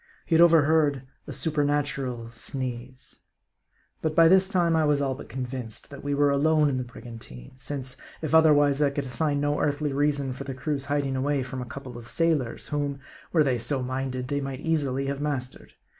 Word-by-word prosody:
He - - -2
had 165 - +6
overheard 155 -4 +4 0.2
a - - -5
supernatural 140 -6 -1
sneeze. 125 +1 -5 0.8
But 155 -1 -1
by 165 -1 +7
this 190 +2 +5
time 175 -4 +2
I 160 - +3
was 150 -1 +3
all 135 -2 0
but - - -10
convinced, 125 -1 -6
that 140 0 -9
we 145 0 -1
were 145 0 +3
alone 150 +1 +3
in 130 -2 -1
the - - -2
brigantine. 115 - -10
Since, 130 0 -6 0.2
if 155 -1 -4
otherwise, 145 -3 +5
I 145 - +4
could 140 0 -3
assign 145 +3 +1
no 145 0 0
earthly 145 0 0
reason 140 -2 0
for 130 - -7
the 135 -1 -6
crew's 140 +1 -2
hiding 140 -1 -1
away 135 +1 0
from 130 0 -6
a - - -5
couple 125 -1 -8
of 120 - -12
sailors, 155 -6 0
whom, 145 -2 -2 0.3
were 160 -3 +4
they 130 -4 +1
so 130 +2 -2
minded, 130 0 -3
they 145 0 -1
might 135 0 -5
easily 140 -5 0
have 140 +1 -3
mastered. 135 -4 -4
140 Hz, 190 wpm, -26 LUFS, 130-150 Hz, 0.8 s, by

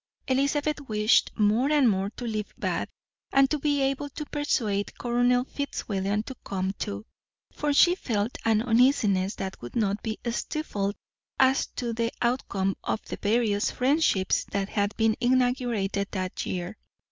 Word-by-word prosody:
Elizabeth 285 +3 +1
wished 215 +1 +3
more 220 +6 +3
and 290 -4 +5
more 195 -2 +1
to 240 +3 -8
leave 215 -2 -4
Bath, - - -2 0.4
and 275 -1 +4
to 305 - +1
be 285 -1 +1
able 275 +2 -1
to 300 +2 -6
persuade 225 -10 -1
Colonel 245 +1 +2
Fitzwilliam 210 -7 -2
to 265 - -7
come 190 -1 -2
too; 100 +1 -4 0.5
for 295 - -1
she 345 +5 +6
felt 225 - -2
an 220 -1 +2
uneasiness 225 -6 +3
that 190 0 -6
would 120 - -9
not 210 -2 0
be 220 -1 -3
stifled 210 -7 -2 0.4
as 265 +1 +4
to 235 -2 -4
the 230 0 -1
outcome 200 -6 0
of - - -2
the - - -4
various 210 -1 +1
friendships 255 - +2
that 200 0 -3
had 205 0 -1
been 225 -1 +3
inaugurated 245 -6 +1
that 185 -2 -3
year. 180 +3 -4
225 Hz, 150 wpm, -27 LUFS, 200-265 Hz, 0.5 s, she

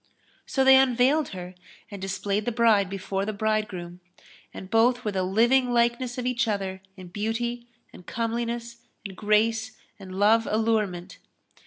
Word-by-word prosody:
So 265 - +1
they 265 0 +8
unveiled 265 +4 +3
her 180 -1 -8 0.4
and 200 -2 -8
displayed 195 +2 -2
the 240 - 0
bride 220 -4 +3
before 195 0 -3
the 215 +2 -3
bridegroom; 200 -5 -2 0.5
and 190 - -9
both 240 +3 +2
were 210 - 0
the 190 -1 -1
living 240 +7 +2
likeness 240 +1 0
of 250 - -3
each 250 0 0
other 195 -3 -3 0.2
in 185 -2 -11
beauty 235 +4 -3 0.3
and - - -13
comeliness 235 +2 -3 0.3
and 195 -2 -7
grace 220 +2 +1 0.2
and 185 -1 -9
love 220 +3 +3
allurement. 210 -5 -1
220 Hz, 150 wpm, -25 LUFS, 195-235 Hz, 0.5 s, they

